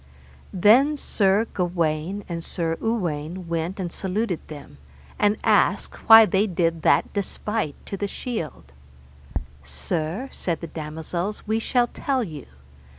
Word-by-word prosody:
Then 245 Hz, +11 st, +5 dB
Sir 205 Hz, -4 st, +2 dB
Gawaine 175 Hz, +1 st, -1 dB
and 170 Hz, -1 st, -4 dB
Sir 165 Hz, -2 st, -2 dB
Uwaine 180 Hz, -6 st, -2 dB
went 170 Hz, +3 st, -2 dB
and 175 Hz, -2 st, -3 dB
saluted 190 Hz, -1 st, -2 dB
them, 145 Hz, -, -11 dB, 0.4 s
and 205 Hz, +1 st, +3 dB
asked -, -, +1 dB
why 225 Hz, 0 st, +11 dB
they 200 Hz, +2 st, +2 dB
did 165 Hz, -3 st, 0 dB
that -, -, +3 dB
despite 205 Hz, -4 st, -2 dB
to 195 Hz, -, -5 dB
the 205 Hz, -, -2 dB
shield. 165 Hz, -, -6 dB, 0.9 s
Sir, 155 Hz, -, -3 dB
said 170 Hz, -3 st, -3 dB
the -, -, -6 dB
damosels, 160 Hz, +5 st, -5 dB
we 220 Hz, +1 st, +1 dB
shall 245 Hz, +1 st, +2 dB
tell 260 Hz, +1 st, -1 dB
you. 155 Hz, -, -8 dB
180 Hz, 130 wpm, -24 LUFS, 160-215 Hz, 0.9 s, why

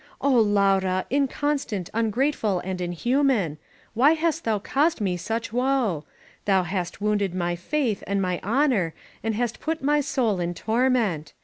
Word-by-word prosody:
^^Ohy 255 Hz, -5 st, +4 dB
Laura, 195 Hz, -2 st, +2 dB
inconstant, 275 Hz, -, -1 dB
ungrateful 225 Hz, -1 st, +1 dB
and 185 Hz, 0 st, -4 dB
inhuman, 200 Hz, -, +1 dB, 0.3 s
why 265 Hz, +7 st, +5 dB
hast 325 Hz, -1 st, -1 dB
thou 220 Hz, -2 st, +2 dB
caused 285 Hz, +10 st, +1 dB
me 190 Hz, -4 st, 0 dB
such 225 Hz, +5 st, -4 dB
woe? 245 Hz, -, +1 dB, 0.4 s
Thou 190 Hz, -2 st, +3 dB
hast 180 Hz, +1 st, -4 dB
wounded 205 Hz, -3 st, 0 dB
my 175 Hz, -1 st, -1 dB
faith 230 Hz, -, -1 dB
and 200 Hz, 0 st, 0 dB
my 180 Hz, -2 st, -1 dB
honor 225 Hz, -, +1 dB, 0.3 s
and 225 Hz, -1 st, -1 dB
hast 240 Hz, +1 st, -2 dB
put 320 Hz, -2 st, -3 dB
my 295 Hz, +1 st, +3 dB
soul 240 Hz, -8 st, 0 dB
in 175 Hz, 0 st, -2 dB
torment. 220 Hz, -, 0 dB
215 Hz, 145 wpm, -25 LUFS, 185-265 Hz, 0.4 s, why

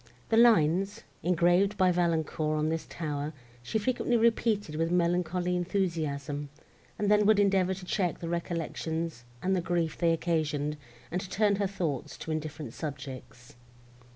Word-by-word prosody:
The 225 Hz, -, +3 dB
lines, 205 Hz, -2 st, +4 dB, 0.2 s
engraved 180 Hz, +4 st, +3 dB
by 185 Hz, -2 st, +4 dB
Valancourt 160 Hz, -3 st, 0 dB
on 155 Hz, +1 st, +1 dB
this 160 Hz, 0 st, -2 dB
tower, 150 Hz, -2 st, -3 dB, 0.3 s
she 120 Hz, -, -2 dB
frequently 240 Hz, +2 st, +1 dB
repeated 225 Hz, -6 st, +2 dB
with 165 Hz, +1 st, 0 dB
melancholy 175 Hz, 0 st, +1 dB
enthusiasm, 155 Hz, -6 st, -2 dB, 0.5 s
and 210 Hz, 0 st, +1 dB
then 210 Hz, 0 st, +5 dB
would 215 Hz, -1 st, +5 dB
endeavour 190 Hz, -2 st, +3 dB
to 185 Hz, 0 st, -9 dB
check 180 Hz, -2 st, 0 dB
the 170 Hz, -, -6 dB
recollections 165 Hz, -4 st, -3 dB, 0.2 s
and 190 Hz, +1 st, +2 dB
the 180 Hz, -, +1 dB
grief 170 Hz, -2 st, 0 dB
they 170 Hz, -1 st, +3 dB
occasioned, 155 Hz, -3 st, 0 dB, 0.3 s
and 180 Hz, +2 st, -1 dB
to 185 Hz, -, -8 dB
turn 205 Hz, -1 st, +2 dB
her 200 Hz, -1 st, +1 dB
thoughts 165 Hz, -9 st, -3 dB
to 160 Hz, -, -6 dB
indifferent 155 Hz, -5 st, -4 dB
subjects. 135 Hz, -4 st, -8 dB
170 Hz, 150 wpm, -29 LUFS, 155-190 Hz, 0.5 s, then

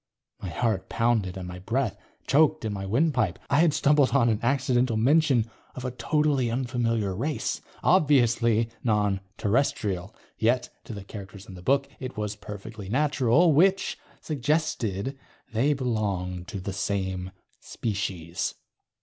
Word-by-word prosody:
My 95 Hz, -, -4 dB
heart 95 Hz, 0 st, -1 dB
pounded 110 Hz, -5 st, +1 dB
and 90 Hz, -1 st, -6 dB
my 90 Hz, 0 st, -7 dB
breath 115 Hz, +4 st, -1 dB, 0.3 s
choked 155 Hz, 0 st, +3 dB
in 110 Hz, -, -2 dB
my 95 Hz, -1 st, -4 dB
windpipe. 120 Hz, -, +1 dB
I 140 Hz, -, +4 dB
had 165 Hz, -1 st, +5 dB
stumbled 145 Hz, -2 st, +4 dB
on 120 Hz, -4 st, +4 dB
an 110 Hz, -2 st, +1 dB
accidental 125 Hz, -2 st, +1 dB
mention 135 Hz, -1 st, +4 dB, 0.3 s
of 130 Hz, -, -6 dB
a 130 Hz, -, -2 dB
totally 145 Hz, -1 st, +1 dB
unfamiliar 115 Hz, -5 st, -1 dB
race. 145 Hz, +9 st, -2 dB, 0.2 s
Obviously 120 Hz, -, +3 dB
non 105 Hz, -4 st, +2 dB, 0.2 s
Terrestrial. 105 Hz, -4 st, 0 dB, 0.2 s
Yet, 120 Hz, +2 st, +2 dB, 0.2 s
to 115 Hz, -, -7 dB
the 100 Hz, -, -7 dB
characters 100 Hz, -1 st, -10 dB
in 95 Hz, -, -11 dB
the 90 Hz, -, -10 dB
book, 140 Hz, +7 st, +2 dB
it 130 Hz, -3 st, -6 dB
was 105 Hz, -1 st, -2 dB
perfectly 105 Hz, 0 st, -8 dB
natural 145 Hz, -, +3 dB
which 190 Hz, +6 st, +3 dB, 0.3 s
suggested 135 Hz, -, -1 dB, 0.3 s
they 125 Hz, +7 st, +2 dB
belonged 100 Hz, -9 st, -2 dB
to 100 Hz, -, -5 dB
the 95 Hz, +1 st, -5 dB
same 95 Hz, -1 st, -2 dB, 0.3 s
species. 95 Hz, -6 st, -3 dB
115 Hz, 140 wpm, -26 LUFS, 100-135 Hz, 0.3 s, had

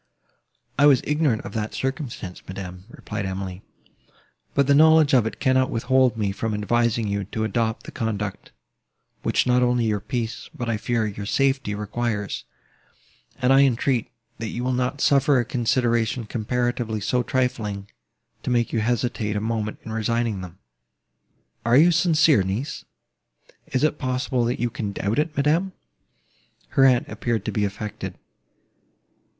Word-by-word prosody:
"I 145 Hz, -, +7 dB
was 135 Hz, -4 st, +5 dB
ignorant 150 Hz, -6 st, +1 dB
of -, -, -8 dB
that 110 Hz, -2 st, -3 dB
circumstance, 135 Hz, -, -4 dB
madam," 90 Hz, -1 st, -7 dB
replied 105 Hz, -4 st, -5 dB
Emily, 95 Hz, 0 st, -5 dB, 0.9 s
"but 140 Hz, -, +4 dB
the 140 Hz, -, +4 dB
knowledge 155 Hz, 0 st, +6 dB
of 120 Hz, -4 st, +5 dB
it -, -, -7 dB
cannot 130 Hz, -1 st, +2 dB
withhold 125 Hz, 0 st, +2 dB
me 105 Hz, -3 st, 0 dB
from 110 Hz, +2 st, -2 dB
advising 115 Hz, +1 st, +1 dB
you 100 Hz, 0 st, -2 dB
to 110 Hz, +3 st, -3 dB
adopt 110 Hz, +1 st, -1 dB
the -, -, -9 dB
conduct, 105 Hz, -5 st, -4 dB, 0.7 s
which -, -, +1 dB
not 125 Hz, 0 st, +3 dB
only 125 Hz, -1 st, +2 dB
your 105 Hz, -2 st, +1 dB
peace, 115 Hz, +2 st, -4 dB
but, 120 Hz, -, -4 dB
I 115 Hz, -2 st, 0 dB
fear, 115 Hz, +1 st, 0 dB
your 100 Hz, -1 st, -5 dB
safety 135 Hz, -4 st, +1 dB
requires, 105 Hz, -, -3 dB, 0.9 s
and 130 Hz, 0 st, +4 dB
I 135 Hz, -, +7 dB
entreat, 125 Hz, -2 st, +2 dB, 0.3 s
that 115 Hz, -, -3 dB
you 120 Hz, +3 st, -4 dB
will 130 Hz, 0 st, 0 dB
not 125 Hz, +3 st, -1 dB
suffer 140 Hz, -1 st, +4 dB
a 120 Hz, -, 0 dB
consideration 120 Hz, -1 st, 0 dB
comparatively 120 Hz, 0 st, -1 dB
so 125 Hz, +5 st, 0 dB
trifling, 115 Hz, -6 st, -2 dB, 0.5 s
to -, -, -4 dB
make 120 Hz, -2 st, +1 dB
you 115 Hz, -, +2 dB
hesitate 115 Hz, -2 st, -1 dB
a -, -, +1 dB
moment 110 Hz, 0 st, -2 dB
in 110 Hz, -, -7 dB
resigning 110 Hz, -2 st, -1 dB
them." 90 Hz, -1 st, -9 dB, 1.1 s
"Are 120 Hz, +3 st, +4 dB
you 170 Hz, +4 st, +7 dB
sincere, 160 Hz, -, +4 dB
niece?" 100 Hz, +10 st, -3 dB, 0.8 s
"Is 130 Hz, -, -1 dB
it 155 Hz, -1 st, +1 dB
possible 130 Hz, -2 st, 0 dB
you 120 Hz, -1 st, -1 dB
can 105 Hz, -5 st, -4 dB
doubt 105 Hz, +7 st, -1 dB
it, 155 Hz, 0 st, -1 dB
madam?" 165 Hz, +7 st, +2 dB, 1.0 s
Her 135 Hz, -, +4 dB
aunt 125 Hz, -2 st, +4 dB
appeared 120 Hz, -2 st, -2 dB
to -, -, -1 dB
be 105 Hz, -2 st, 0 dB
affected. 105 Hz, +1 st, -5 dB
120 Hz, 155 wpm, -24 LUFS, 105-130 Hz, 1.1 s, I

